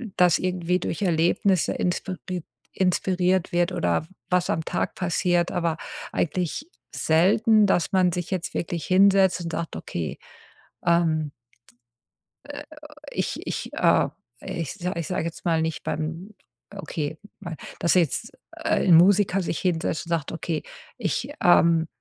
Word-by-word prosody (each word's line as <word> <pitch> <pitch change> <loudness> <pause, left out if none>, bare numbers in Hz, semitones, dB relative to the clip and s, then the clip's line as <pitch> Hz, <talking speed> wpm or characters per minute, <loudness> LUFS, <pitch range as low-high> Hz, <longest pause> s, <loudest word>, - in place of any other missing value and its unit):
das 180 -2 +4
irgendwie 180 -1 0
durch 170 - -4
Erlebnisse 175 +1 +2
inspiriert 180 -1 -3 0.3
inspiriert 185 -1 +1
wird 175 +1 +1
oder 90 - 0 0.2
was 180 -1 +1
am 160 - -1
Tag - - -2
passiert, 175 0 +1
aber 170 -2 -1 0.3
eigentlich 180 - -2 0.3
selten, 215 +7 +4
dass 180 -4 +1
man 185 -2 +3
sich 175 0 -4
jetzt 185 -2 -3
wirklich 170 -1 -3
hinsetzt 190 -1 +4
und 165 - -4
sagt: 165 0 -4
„Okay, 80 -3 -5 0.7
ähm“ 165 -3 +2 1.1
äh, 290 +1 -8 0.5
ich - - -2
ich, - - -4
äh, - - +3 0.3
ich 165 -5 -4
sa 180 +1 -3
ich 170 -2 -3
sage 180 - -2
jetzt 170 - -7
mal 165 -2 +2
nicht 160 -1 -3
beim, 165 +7 -4 0.4
okay 160 -5 -4 0.2
mein 175 -4 -6 0.2
dass 170 - +3
jetzt, 170 -6 +1 0.2
äh, - - 0
'n 175 - +8
Musiker 195 +2 +5
sich 170 - -3
hinsetzt 170 -3 -1
und - - -10
sagt: 165 -4 -1
„Okay, 165 -1 -3 0.3
ich, - - -2
ähm 170 -2 +5
175 Hz, 140 wpm, -25 LUFS, 165-185 Hz, 1.1 s, n